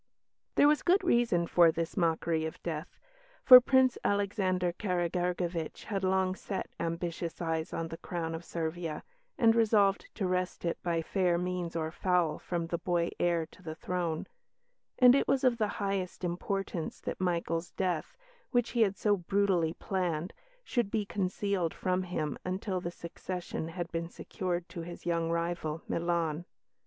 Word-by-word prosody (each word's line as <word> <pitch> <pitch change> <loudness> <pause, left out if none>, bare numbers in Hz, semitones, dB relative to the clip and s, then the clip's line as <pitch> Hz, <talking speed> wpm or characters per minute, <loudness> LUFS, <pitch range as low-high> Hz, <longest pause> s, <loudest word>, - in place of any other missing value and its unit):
There 290 - +6
was 300 0 +4
good 375 +2 +3
reason 235 - +3
for 170 -1 +5
this 165 +1 -3
mockery 165 -2 +1
of 160 - -5
death, 160 0 -5 0.5
for 255 -1 +11
Prince 260 0 +3
Alexander 190 -3 +1
Karageorgevitch 175 -2 -1
had 195 -3 -3
long 190 0 +2
set 190 +1 -5
ambitious 170 0 -3
eyes 160 -1 -2
on 165 0 -3
the 165 - -7
crown 165 -2 -3
of 165 +1 -5
Servia, 165 -1 -4 0.3
and 230 -4 +5
resolved 210 -4 +3
to 195 - -1
wrest 180 -1 -1
it 170 - -2
by 170 -2 0
fair 180 -1 +1
means 180 -1 -3
or 160 -1 -1
foul 180 -2 +1
from 170 -2 -2
the 170 0 -3
boy 175 -1 0
heir 170 -2 +2
to - - -17
the 160 -3 -6
throne; 170 -2 -2 0.7
and 250 -1 +8
it 275 - +2
was 270 -1 +2
of 245 -3 +3
the 215 - +2
highest 195 -3 -2
importance 180 -1 -3
that - - -5
Michael's 170 -2 -1
death, 180 -4 -2 0.3
which 245 -2 +1
he 240 - +1
had 200 -3 +3
so 210 -1 +3
brutally 180 -3 +1
planned, 180 -3 -2 0.3
should 240 - 0
be 210 -1 -1
concealed 195 -3 -1
from 185 0 0
him 155 -6 -3
until 185 0 -2
the 170 - -3
succession 175 -1 -5
had 170 0 -5
been 165 0 -3
secured 175 -1 -4
to 170 - -7
his 175 +1 -9
young 165 -1 0
rival, 170 -1 -2
Milan. 170 -1 -1
175 Hz, 160 wpm, -31 LUFS, 170-195 Hz, 0.7 s, for